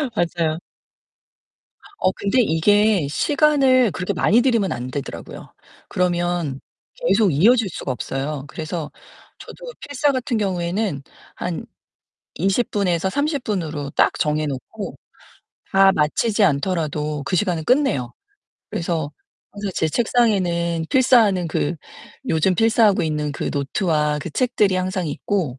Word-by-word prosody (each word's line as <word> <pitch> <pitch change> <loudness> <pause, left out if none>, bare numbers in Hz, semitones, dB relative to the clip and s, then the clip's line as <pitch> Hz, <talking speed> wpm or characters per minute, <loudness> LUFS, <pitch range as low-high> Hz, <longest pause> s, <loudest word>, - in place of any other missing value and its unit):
맞아요. 165 -3 0 1.4
어 185 - +2
근데 200 +6 +1
이게 205 0 +3
시간을 270 - +3
그렇게 185 - -3
많이 230 +4 +3
들이면 230 -7 +1
안 125 +1 -4
되더라고요. 140 0 -7 0.4
그러면 175 -5 -1 0.4
계속 230 - +2
이어질 210 - +4
수가 140 - -4
없어요. 135 +3 -4
그래서 155 +1 -5 0.5
저도 - - -11 0.2
필사 285 0 0
같은 255 -3 -1
경우에는 185 -4 -1 0.3
한 175 -2 -4 0.7
20 195 +7 0
분에서 190 -3 0
30 285 - -1
분으로 155 - -3
딱 - - +3
정해 150 0 +1
놓고 135 -3 -6 0.8
다 195 0 +6
마치지 205 +9 +1
않더라도 150 -2 -1
그 180 - -1
시간은 180 -5 0
끝내요. 245 - +1 0.6
그래서 165 -3 -2 0.4
항상 205 -1 -4
제 160 - +1
책상에는 175 -6 +1
필사하는 220 -9 +4
그 160 +1 -1 0.5
요즘 165 +4 +2
필사하고 220 0 +3
있는 150 -2 -2
그 - - -3
노트와 150 +1 0
그 175 - -6
책들이 215 -3 +1
항상 185 -1 -2
있고 150 -4 -2
180 Hz, 265 characters per minute, -21 LUFS, 155-215 Hz, 1.4 s, 다